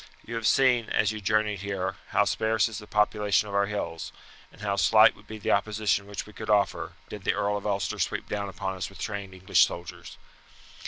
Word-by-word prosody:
You 115 - -7
have 115 -1 -1
seen, 125 -4 +3
as 105 0 +2
you 110 -1 -6
journeyed 105 0 +1
here, 95 -1 -3
how - - +2
sparse 110 -1 +1
is 110 -2 -6
the 105 - -12
population 105 -1 +2
of 100 - -7
our 100 0 +2
hills, 85 -6 -4 0.4
and - - -17
how 100 -1 0
slight 110 +2 +6
would 105 - -19
be 110 - -7
the 105 - -1
opposition 105 -1 +1
which 100 -1 -5
we 105 - -14
could 110 +1 -8
offer, 105 -1 +1
did 105 -2 -8
the - - +1
Earl 100 0 0
of 100 0 -4
Ulster 100 -2 -1
sweep - - -1
down 100 -1 -3
upon 95 0 -4
us 95 - -4
with 95 - -14
trained 100 -3 -5
English 95 0 +4
soldiers. 85 -1 -5
105 Hz, 215 wpm, -27 LUFS, 100-110 Hz, 0.4 s, slight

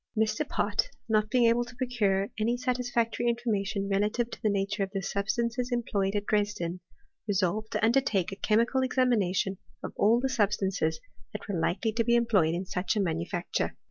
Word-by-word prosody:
Mr. 220 +7 0
Pott, - - 0 0.2
not 215 -1 +2
being 245 0 +3
able 235 +1 +4
to 235 -1 -12
procure 220 -5 0
any 235 +3 +1
satisfactory 245 -2 -1
information 210 -4 -1
re 195 -1 +1
lative 230 +4 0
to - - -8
the 215 - +2
nature 200 +1 -1
of 195 - 0
the 195 - 0
substances 235 +5 -1
employed 205 -5 0
at 205 0 -1
Dresden, 205 -5 -1 0.5
resolved 205 +2 0
to - - +2
undertake 225 -7 +2
a - - -5
chemical 230 +6 +2
examina 250 -8 +2
tion 190 0 -1 0.2
of - - -5
all 225 +3 +4
the 265 - 0
substances 195 -8 0 0.3
that - - -7
were 195 -5 -2
likely 190 +7 0
to 230 +2 +1
be 235 +1 +3
em 235 0 +3
ployed 180 -8 +3
in 180 +2 -3
such 180 +4 -1
a - - +1
manufactui^. 170 0 -1
215 Hz, 185 wpm, -28 LUFS, 195-235 Hz, 0.5 s, able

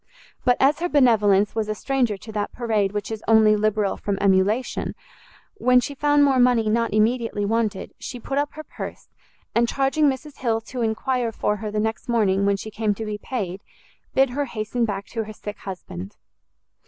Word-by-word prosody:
But 245 -1 +3
as 280 +3 +4
her 350 +1 -1
benevolence 210 - +4
was 220 -1 -2
a 215 - -1
stranger 250 -4 0
to 220 +3 -10
that 210 -1 -2
parade 215 -5 0
which 205 +1 -4
is 220 -1 -5
only 220 -1 +6
liberal 210 -1 0
from 200 -1 -2
emulation, 200 +5 +1 0.6
when 250 0 +5
she 285 - -3
found 290 +1 +3
more 270 -2 +4
money 240 -3 +4
not 230 +1 +1
immediately 220 -1 +1
wanted, 215 -2 -1
she 245 - -6
put 275 +4 -2
up 290 0 -2
her 310 - -8
purse, - - -8 0.4
and 235 0 +3
charging 275 +2 +2
Mrs 275 +2 -6
Hill 230 -3 +1
to 245 +2 -6
enquire 235 +2 0
for 210 -1 -1
her 215 0 -4
the 210 0 -2
next 220 +3 -2
morning 200 -4 +2
when 200 0 +2
she 215 +2 -7
came 215 -1 0
to 220 - -5
be 210 -1 -4
paid, 200 -6 -4 0.5
bid 270 -1 +4
her 285 +3 -1
hasten 230 0 -2
back 200 -2 -3
to 225 -2 -4
her 215 - -8
sick 210 0 -8
husband. 190 0 -8
220 Hz, 190 wpm, -23 LUFS, 210-250 Hz, 0.6 s, only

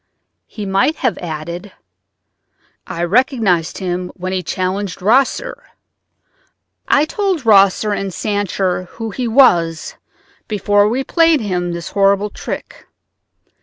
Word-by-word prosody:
He 210 - -7
might 195 +11 +1
have 255 -6 -1
added: 170 +4 -6 1.1
"I 170 - -4
recognized 195 - +1
him 180 -1 -3
when 185 +1 -4
he 185 - -1
challenged 185 +3 -3
Rosser. 260 - +1 1.2
I 290 - +4
told 380 - -2
Rosser 200 0 +4
and 195 -1 -3
Sancher 195 -1 -1
who 225 -1 -5
he 245 +4 -3
was 175 - +3 0.5
before 205 -1 +2
we 255 +4 -1
played 330 -1 +3
him 180 -4 -2
this 170 0 -6
horrible 200 +1 +2
trick. - - -7
200 Hz, 115 wpm, -17 LUFS, 180-230 Hz, 1.2 s, I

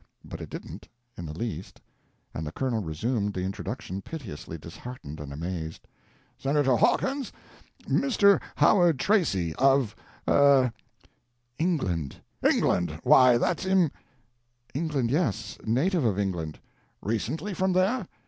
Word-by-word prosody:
—but - - -8
it - - -7
didn't, - - -8 0.3
in 85 - -7
the 75 +1 -7
least, 95 -5 -5 0.5
and 80 0 -4
the - - -4
Colonel 120 +1 -1
resumed 100 +5 -2
the 90 - -2
introduction 95 0 -4
piteously 95 - -7
disheartened 85 - -9
and 75 -1 -7
amazed),—"Senator 95 - -3
Hawkins, 270 - +1 0.5
Mr. 205 -8 +3
Howard 175 -7 +5
Tracy, 125 - +1
of—er—" 135 0 +3 0.9
"England." 95 - 0 0.3
"England!—Why 90 +9 +4
that's 180 +8 0
im—" 185 -5 +3 0.8
"England, 140 -5 -1
yes, 145 - -1
native 155 - +2
of 105 -5 +1
England." 90 -6 -2 0.5
"Recently 130 - -2
from 185 +1 +1
there?" 190 +3 +1
120 Hz, 110 wpm, -27 LUFS, -, 0.9 s, Howard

